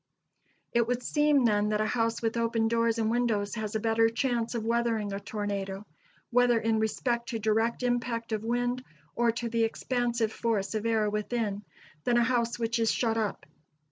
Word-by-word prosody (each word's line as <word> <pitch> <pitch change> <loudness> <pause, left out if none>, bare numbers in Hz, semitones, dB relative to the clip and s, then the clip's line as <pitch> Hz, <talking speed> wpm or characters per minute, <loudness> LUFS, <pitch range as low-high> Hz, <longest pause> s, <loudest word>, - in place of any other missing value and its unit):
It 235 -1 +3
would 245 0 -1
seem, 295 -3 +3
then, 210 -2 +2
that 210 0 0
a 215 - +2
house 230 +1 0
with 225 0 0
open 230 -1 +1
doors 230 0 +1
and 220 -1 +1
windows 225 -4 0
has 220 -1 -4
a - - +2
better 225 +1 +3
chance 240 -1 -1
of 225 -2 -2
weathering 230 -3 0
a 200 - -3
tornado, 200 -1 -4 0.5
whether 245 -1 +4
in 225 0 +1
respect 235 +2 -1
to 235 - -2
direct 225 +3 +1
impact 240 -1 -1
of 215 -1 -1
wind, 245 +2 -1 0.3
or 235 0 +3
to 235 0 -3
the 230 0 +1
expansive 235 -1 -1
force 220 -4 -1
of 215 +1 -1
air 220 -2 +2
within, 210 -1 -2 0.4
than 240 -1 +2
a 240 - +5
house 235 -1 +1
which 230 0 -1
is 225 -1 +3
shut 225 -2 0
up. 215 -3 -2
230 Hz, 185 wpm, -29 LUFS, 220-240 Hz, 0.5 s, a